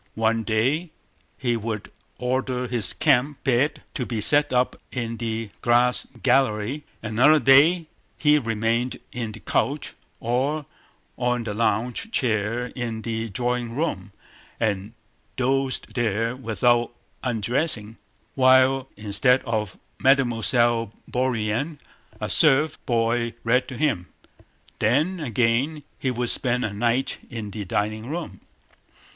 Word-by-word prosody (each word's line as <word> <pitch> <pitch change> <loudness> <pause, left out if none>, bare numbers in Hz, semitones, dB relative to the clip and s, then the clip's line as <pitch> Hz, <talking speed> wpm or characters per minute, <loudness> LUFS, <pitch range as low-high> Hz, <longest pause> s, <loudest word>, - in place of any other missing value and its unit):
One 115 +1 +1
day 125 +10 0 0.5
he 120 -3 0
would 110 -2 -4 0.3
order 125 0 -1
his 120 -5 +1
camp 135 +4 +1
bed 135 +3 +1
to 135 - -2
be 120 -2 -3
set 145 +7 +3
up 125 0 +2 0.2
in 115 -2 -3
the 115 -2 -3
glass 120 +1 +3 0.2
gallery, 130 +1 +1 0.2
another 120 +8 +5
day 155 +5 +5 0.3
he 150 0 +4
remained 115 +1 -1 0.2
on 115 -3 -3
the 110 - -9
couch 145 +1 -1 0.3
or 135 +5 -1 0.5
on 125 -1 0
the 110 -2 -4
lounge 115 - -1
chair 115 - 0
in 115 -3 -4
the 115 -1 -3
drawing 120 +2 -2
room 115 - -2 0.5
and 105 0 -1 0.4
dozed 135 +1 0
there 115 0 0
without 120 0 +1 0.3
undressing, 115 -1 0 0.4
while—instead 130 -2 +3
of 110 -5 -2 0.2
Mademoiselle 120 -3 +3 0.2
Bourienne—a 125 +4 -3
serf 150 0 +3
boy 115 0 +1
read 125 +2 +2
to 130 -3 -7
him. 120 - 0 0.7
Then 150 - +2
again 130 +3 0 0.2
he 130 - -1
would 125 -1 -1
spend 125 -1 0
a 105 - -3
night 120 +5 0
in 110 -4 -6
the 105 0 -5
dining 110 +4 -2
room. 155 - -5
120 Hz, 115 wpm, -24 LUFS, 115-135 Hz, 0.7 s, another